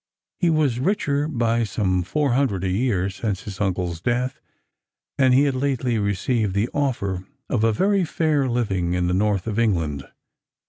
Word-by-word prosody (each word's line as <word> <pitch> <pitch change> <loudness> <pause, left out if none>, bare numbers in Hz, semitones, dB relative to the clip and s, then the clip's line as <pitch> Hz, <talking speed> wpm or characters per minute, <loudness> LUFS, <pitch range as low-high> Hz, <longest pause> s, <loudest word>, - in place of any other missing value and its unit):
He 175 - +3
was 150 -7 +2
richer 145 -3 0
by 120 -5 +1
some 95 -3 0
four 140 - 0
hundred 120 -8 +1
a 95 - 0
year 100 -2 +1
since 95 +1 -3
his 100 -2 -7
uncle's 90 -4 -1
death, 125 +4 -1 0.8
and 130 -1 +5
he 130 +3 +5
had 140 -2 +1
lately 130 -3 0
received 100 +1 0
the 105 +4 +1
offer 100 -10 -2 0.2
of 110 -4 +1
a 115 - +4
very 195 - +2
fair 155 -4 +1
living 95 -8 0
in 90 0 0
the 90 - 0
north 100 -1 +1
of 110 0 -2
England. 80 -11 0
115 Hz, 170 wpm, -23 LUFS, 95-130 Hz, 0.8 s, and